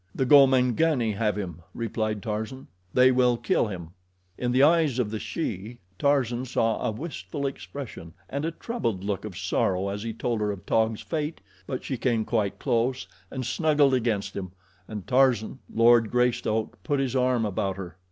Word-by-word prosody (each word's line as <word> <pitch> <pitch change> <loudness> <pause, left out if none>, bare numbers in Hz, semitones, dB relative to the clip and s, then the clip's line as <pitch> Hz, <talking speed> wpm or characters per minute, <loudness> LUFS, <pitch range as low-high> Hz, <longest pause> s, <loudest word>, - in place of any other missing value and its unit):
"The 130 - +1
Gomangani 130 -1 +5
have 105 +1 0
him," 85 -5 -5
replied 110 -2 -2
Tarzan. 110 +4 -4 0.3
"They 130 +3 +6
will 125 -1 +3
kill 115 - +1
him." 85 -5 -7 0.4
In 125 +3 -1
the 130 +2 +4
eyes 155 -4 +4
of 115 -5 0
the 110 - -3
she, 115 - -4 0.2
Tarzan 130 -4 +1
saw 115 -3 0
a - - +1
wistful 145 +3 -5
expression 135 - -6
and 140 +2 -3
a 165 - 0
troubled 165 - -3
look 100 0 -2
of 100 -5 -7
sorrow 95 +1 0
as 100 +1 -4
he 115 +1 -3
told 115 0 -2
her 105 -1 +1
of 100 -2 -8
Taug's 110 -1 +1
fate; 155 -1 -3 0.3
but 130 - -4
she 135 - -3
came 115 -3 +1
quite 105 -4 0
close 120 +3 0 0.2
and 130 -2 -4
snuggled 145 +1 +3
against 110 -5 0
him, 95 -2 -5 0.3
and 105 -4 -6
Tarzan, 130 -2 +2
Lord 115 -1 +5
Greystoke, 120 -3 0
put 145 -3 0
his 135 -2 -1
arm 125 -3 +2
about 95 -1 -2
her. 90 -3 -7
120 Hz, 170 wpm, -26 LUFS, 105-130 Hz, 0.4 s, They